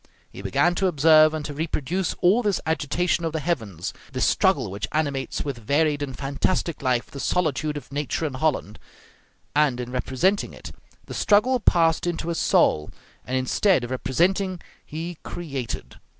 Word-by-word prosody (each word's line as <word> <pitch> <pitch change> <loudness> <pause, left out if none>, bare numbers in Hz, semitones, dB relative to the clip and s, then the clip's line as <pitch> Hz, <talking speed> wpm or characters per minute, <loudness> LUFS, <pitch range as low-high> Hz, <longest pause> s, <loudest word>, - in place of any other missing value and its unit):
He - - -9
began 100 - +2
to 190 +2 +1
observe 155 -1 +6
and 155 -1 -4
to 145 - -5
reproduce 160 +4 -2
all 190 +7 +4
this 205 -5 0
agitation 160 +3 0
of 165 -1 -2
the 160 - -1
heavens, 110 - -3 0.2
this - - +1
struggle - - +2
which 100 +3 -4
animates 145 -4 -2
with 140 -4 -4
varied 145 +5 +1
and 135 -3 -4
fantastic 140 +4 -1
life 125 -2 0
the 140 - -8
solitude 155 -2 0
of 145 - -10
nature 145 +3 -2
in 145 - -3
Holland; 130 -7 -1 0.8
and 145 -4 +3
in 125 0 -5
representing 130 +10 0
it, - - -9 0.3
the - - -8
struggle 235 +5 +3
passed 165 -4 +3
into 170 -1 -2
his 170 - -1
soul, 75 0 +3 0.4
and 130 +1 0
instead 130 +5 +2
of 120 - -5
representing 180 +8 0 0.2
he 165 +2 -6
created. 135 -9 -6
150 Hz, 165 wpm, -24 LUFS, 130-175 Hz, 0.8 s, observe